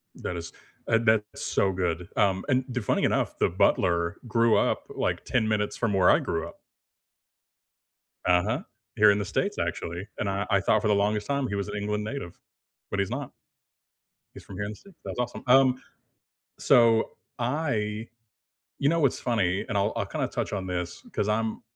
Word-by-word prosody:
That 90 - -5
is 85 - -7 0.3
Uh, 115 - +4
that's 110 -2 +1
so 95 - +1
good, 90 -2 -2
um, 95 -2 +2
and 130 -2 +2
the 125 0 -2
funny 105 - +1
enough, - - 0
the - - +3
butler 85 -1 +2
grew 115 0 +3
up, - - +1
like, - - -1
10 115 -4 +1
minutes 105 -1 0
from 115 -4 0
where 95 -2 +5
I - - +5
grew 80 -1 -2
up. - - -14 1.7
Uh-huh, 100 - +2 0.3
here 105 -2 +7
in 100 - +1
the 100 - -2
states 200 - -1
actually, 85 +4 -3
and 100 - 0
I 100 +1 -1
I 100 -2 +4
thought 110 +1 +3
for 110 - 0
the 105 - +4
longest 105 +1 0
time 140 -2 0
he 100 - -3
was 100 0 -2
an 105 - -5
England 105 +1 -2
native, 110 -6 -6 0.5
but 100 - -2
he's 100 - 0
not. - - -4 1.0
He's - - -10
from 95 - -10
here 100 - -2
in 105 - -4
the - - -8
states. 195 - -19
That's - - -6
awesome. 125 -1 -3
Um, 130 0 +5 0.8
so 115 -2 +4 0.3
I 115 -5 -1 0.7
You 140 - +3
know, 165 0 +2
what's 140 - +2
funny, 100 -6 0
and 100 - 0
I'll 100 +2 +1
I'll - - -1
kinda - - -2
touch - - -3
on 95 -2 -2
this 90 -1 -4
'cause 105 - 0
I'm 110 +1 -1
105 Hz, 190 wpm, -27 LUFS, 95-115 Hz, 1.7 s, here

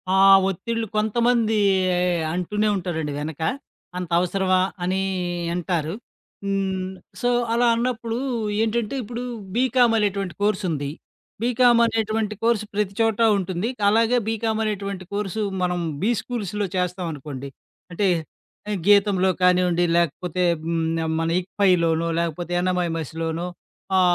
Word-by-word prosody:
ఆ - - +4 0.3
ఒత్తిళ్ళు 230 +5 -3
కొంతమంది 225 +1 +2 0.8
అంటూనే 210 +4 0
ఉంటారండి 160 -5 -3
వెనక. 155 +1 -5 0.6
అంత 180 -2 -4
అవసరమా 185 +1 +1 0.2
అని 185 +2 0 0.6
అంటారు. 170 -2 -1 0.5
హ్మ్. 190 -1 -1 0.3
సో 245 - +2 0.2
అలా 240 +1 +3
అన్నప్పుడు 235 -1 -2 0.4
ఏంటంటే 225 +2 0
ఇప్పుడు 235 +3 -6 0.3
బీకామ్ 250 -2 +3
అనేటువంటి 200 -4 -1
కోర్స్ 210 0 +1
ఉంది. 145 -3 -2 0.5
బీకామ్ 240 0 +4
అనేటువంటి 220 -1 -1
కోర్స్ 230 -2 +2
ప్రతి 205 -1 -1
చోటా 225 0 +3
ఉంటుంది. 185 +3 -2 0.2
అలాగే 230 +3 +3
బీకామ్ 225 0 -1
అనేటువంటి 200 -3 -3
కోర్స్ 205 -1 -3 0.3
మనం 180 0 0 0.2
బీస్కూల్స్‌లొ 210 -3 -1
చేస్తామనుకోండి. 155 -7 -4 0.4
అంటే. 195 +3 +1 0.8
గీతంలో 200 -2 +4
కానివ్వండి. 180 -1 +3
లేకపోతే, 170 +2 -1 0.2
హ్మ్, 165 0 -1 0.4
మన 165 - 0 0.2
ఇప్పాయిలోనో 170 -4 +2
లేకపోతే 170 +1 -3
యన్నామయమసిలోనో 165 -2 -2 0.5
ఆ, - - +5
195 Hz, 105 wpm, -23 LUFS, 175-225 Hz, 0.8 s, ఆ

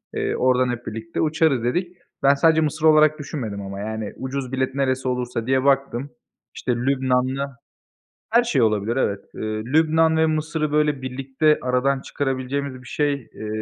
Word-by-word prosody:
Eee, - - -1
oradan 130 0 +2
hep 120 0 -5
birlikte 115 +1 -4
uçarız 155 -5 +2
dedik. 175 +8 -1 0.3
Ben 140 - +6
sadece 160 +3 +4
Mısır 155 +1 -1
olarak 155 0 +5
düşünmedim 120 -9 -5
ama, 100 0 -6
yani, 110 0 -4
ucuz 130 -1 -4
bilet 130 0 -1
neresi 130 -1 0
olursa 125 -2 -2
diye 130 0 +2
baktım. 135 -1 +1 0.5
İşte, - - -2
Lübnan'la 130 +1 0 0.8
Her 235 +2 +5
şey 145 - +1
olabilir, 110 +1 +1
evet. 100 -6 0
Eee, - - -7
Lübnan 155 +9 +2
ve 160 0 +4
Mısır'ı, 155 -1 -1
böyle, 150 -3 +1
birlikte 135 +4 +1
aradan 130 +2 +1
çıkarabileceğimiz 135 -1 -3
bir - - -15
şey, 145 +3 0
eee, 120 -5 -9
135 Hz, 160 wpm, -22 LUFS, 125-150 Hz, 0.8 s, Ben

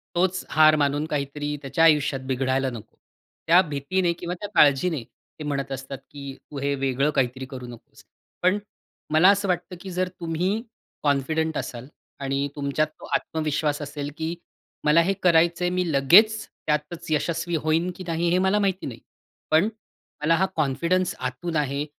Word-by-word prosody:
तोच 185 +1 +1
हार 155 0 +6
मानून 145 0 +1
काहीतरी 145 0 -3
त्याच्या 140 +3 0
आयुष्यात 150 -4 +4
बिघडायला 130 0 0
नको. 115 -4 -10 0.5
त्या 170 +2 +7
भीतीने 170 +3 -1
किंवा 175 +1 -5
त्या 205 - -5
काळजीने 145 0 +4
ते 155 - -15
म्हणत 140 -2 -3
असतात, 135 +1 -5
की 140 -1 -7 0.2
"तू 145 - -5
हे 140 +1 0
वेगळं 135 +1 +1
काहीतरी 130 -2 -1
करू 130 -2 -8
नकोस". 140 +4 -14 0.4
पण 185 +3 +3 0.6
मला 160 +5 +7
असं 200 0 +3
वाटतं, 180 0 -2
की 195 - -7
जर 180 +1 0
तुम्ही 175 +6 -1 0.4
कॉन्फिडंट 155 +2 +1
असाल 125 -1 -5 0.3
आणि 140 0 -1
तुमच्यात 145 +2 0
तो - - -10
आत्मविश्वास 155 -1 -1
असेल, 145 0 -5
की 160 +1 -2 0.5
मला 150 +3 +5
हे 185 +4 +1
करायचं 170 0 +4
आहे. 175 - +2
मी 180 -2 0
लगेचं 205 +11 +5 0.2
त्यातचं 155 +2 -1
यशस्वी 170 +2 -1
होईन, 160 +3 +1
की 185 - -8
नाही 170 +1 0
हे 180 - +3
मला 190 +2 +2
माहिती 195 -2 0
नाही. 120 -4 -6 0.5
पण, 160 +7 +4 0.5
मला 160 +2 +3
हा 190 +3 +2
कॉन्फिडन्स 170 +5 +1
आतून 130 +7 -4
आहे, 145 -1 0
155 Hz, 160 wpm, -24 LUFS, 140-175 Hz, 0.6 s, त्या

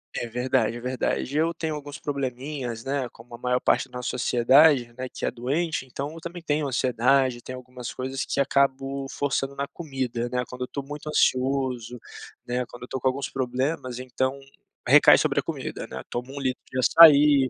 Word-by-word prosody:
é 120 - -2
verdade, 125 0 0
é - - -7
verdade. 130 +2 -2
Eu, 165 +2 +2
tenho 160 -1 -3
alguns 145 0 -7
probleminhas, 130 -3 -4
né. 135 -2 -2
Como 120 +1 -16
a - - -7
maior 125 +1 0
parte 130 - +1
da 125 - -8
nossa 125 - -3
sociedade, 125 +1 +4
né, 130 0 -4
que - - -5
é - - 0
doente. 135 +4 -2
Então, 140 +4 -5
eu 165 - -9
também 170 +1 -7
tenho 150 -2 0
ansiedade, 125 0 +2
tem 130 - -7
algumas 125 -1 -8
coisas 130 +1 -3
que - - -2
acabo 135 0 +1
forçando 140 -1 -2
na 140 0 -3
comida, 130 -7 -4
né. 125 0 -1
Quando 125 0 -10
eu - - -4
tô 140 - -5
muito 150 +2 -7
ansioso, 130 -4 0 0.5
né, 125 +1 -1
quando 120 0 -11
eu - - -7
tô 130 - -3
com 130 - 0
alguns 135 +2 -1
problemas, 130 0 -2
então, 130 +2 -2 0.5
recai - - +8
sobre - - +1
a - - -2
comida, - - -5
né. 65 0 -7
Tomo 125 +3 -5
um - - -4
litro 130 -2 -2
de 130 - -4
açaí. 145 -1 +7
130 Hz, 195 wpm, -25 LUFS, 125-140 Hz, 0.5 s, recai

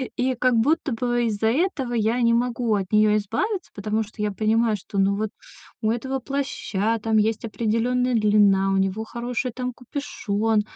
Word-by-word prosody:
и 255 0 0
как 255 +1 +2
будто 280 +3 +2
бы 240 0 0
из-за 220 0 0
этого 270 -1 0
я 230 +1 +1
не 235 -1 +4
могу 235 -1 0
от 190 -2 -2
нее 210 0 +5
избавиться. 365 - -2
Потому 215 +2 -1
что 215 0 -10
я 210 -1 0
понимаю, 220 +1 +1
что, 200 +1 -8
ну, 200 +1 +2
вот 215 0 -1 0.5
у 215 0 +1
этого 265 +3 -2
плаща 230 -5 -2
там 220 -1 +2
есть 220 +1 +1
определенная 235 +3 0
длина, 205 -3 +4
у 195 - +2
него 195 +3 0
хороший, 240 +2 -3
там, 250 +1 -4
капюшон, 225 -5 -1
225 Hz, 175 wpm, -24 LUFS, 210-250 Hz, 0.5 s, нее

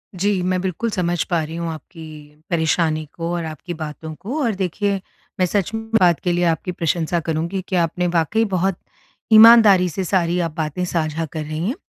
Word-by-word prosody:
जी, 195 +1 0
मैं 185 0 0
बिल्कुल 190 +5 -2
समझ 175 -3 0
पा 170 -3 -1
रही 160 +1 -7
हूँ 170 0 -3
आपकी 155 -1 -11
परेशानी 160 -1 +1
को 170 0 -4
और 170 -1 -2
आपकी 155 +1 -7
बातों 155 0 -7
को। 250 - -4
और 230 -5 0
देखिए 195 +2 -1 0.4
मैं 185 - +4
सच 200 +2 -1
में 225 0 -3 0.2
बात 175 -4 +4
के 180 - +1
लिए 175 0 0
आपकी 165 +2 0
प्रशंसा 170 0 -1
करुँगी 165 +4 -2
कि 190 - -2
आपने 175 +1 0
वाक़ई 170 +7 +2
बहुत 190 -2 0 0.6
ईमानदारी 215 -4 +8
से 190 +3 -3
सारी 180 -1 +1
आप 155 - -12
बातें 160 +2 -2
साझा 165 -2 -2
कर 160 - -3
रही 155 +4 -3
हैं। 245 - -1
175 Hz, 190 wpm, -20 LUFS, 160-190 Hz, 0.6 s, ईमानदारी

